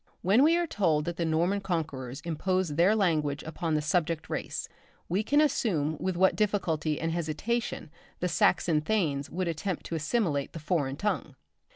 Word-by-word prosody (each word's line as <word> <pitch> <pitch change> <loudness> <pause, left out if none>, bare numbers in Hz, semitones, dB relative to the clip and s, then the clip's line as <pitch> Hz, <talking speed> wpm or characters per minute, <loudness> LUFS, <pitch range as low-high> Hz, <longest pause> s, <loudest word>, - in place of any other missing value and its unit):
When 200 +7 +5
we 325 +4 +5
are 345 - +1
told 165 - +1
that 170 -1 -4
the 170 - 0
Norman 170 +5 +1
conquerors 150 -9 -3
imposed 175 0 -1
their 180 +7 +4
language 155 -8 +1
upon 160 0 -2
the 150 - 0
subject 165 0 0
race, - - -3 0.4
we 185 +4 +1
can 285 +7 +2
understand 165 - +1
with 185 -2 -2
what 190 +1 +4
difficulty 165 -8 0
and 165 0 -1
hesitation 170 +3 -2 0.3
the 180 - 0
Saxon 165 -2 +2
thanes 150 -7 0
would 180 +3 -2
attempt 170 +2 -3
to 165 - -4
assimilate 155 - 0
the 165 - -6
foreign 150 -4 -1
tongue. 210 +8 -2
170 Hz, 170 wpm, -29 LUFS, 155-195 Hz, 0.4 s, When